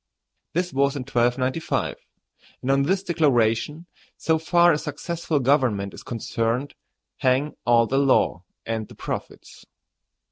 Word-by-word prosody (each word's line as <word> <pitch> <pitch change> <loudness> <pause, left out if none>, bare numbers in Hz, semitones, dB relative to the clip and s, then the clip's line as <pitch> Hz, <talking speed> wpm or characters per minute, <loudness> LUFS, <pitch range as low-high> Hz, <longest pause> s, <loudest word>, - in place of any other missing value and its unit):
This 180 +1 -1
was 140 +1 +2
in 140 - -3
1295; 125 +4 0 0.7
and 130 - +1
on 135 0 +3
this 190 +7 +1
declaration, 150 - +1 0.3
so 160 -1 +1
far 175 +2 +4
as 150 - -1
successful 160 +1 -2
government 125 -8 +1
is - - -10
concerned, 115 +3 -2 0.4
hang 130 +3 +1
all 120 -1 +5
the 135 +4 +1
law 130 -9 +2 0.2
and 110 -2 -3
the - - -14
profits. - - -7
135 Hz, 130 wpm, -24 LUFS, 120-155 Hz, 0.7 s, all